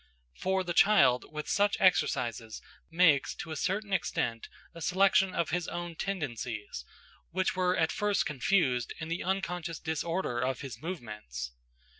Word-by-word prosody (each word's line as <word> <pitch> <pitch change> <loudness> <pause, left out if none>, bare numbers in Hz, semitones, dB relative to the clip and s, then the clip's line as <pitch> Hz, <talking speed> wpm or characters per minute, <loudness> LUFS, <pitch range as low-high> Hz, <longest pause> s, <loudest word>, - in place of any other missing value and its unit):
For 190 - 0
the 175 -1 -3
child 195 -10 +5
with 150 -1 -5
such 205 0 +2
exercises 115 - +1 0.3
makes, 165 -4 +4
to 165 - -7
a - - -3
certain 195 +5 -2
extent, 120 -9 -1 0.2
a 170 - -10
selection 190 +2 +3
of 170 -4 0
his 175 0 -1
own 175 0 -4
tendencies, 125 - -4 0.5
which 185 +1 0
were 180 0 +1
at 160 -2 +2
first 205 +3 +1
confused 135 -4 +1
in 160 0 -5
the 170 - -2
unconscious 180 -3 -2
disorder 160 -4 -2
of 130 +1 -1
his 130 -4 -8
movements. 105 - -6
165 Hz, 145 wpm, -30 LUFS, 125-185 Hz, 0.5 s, child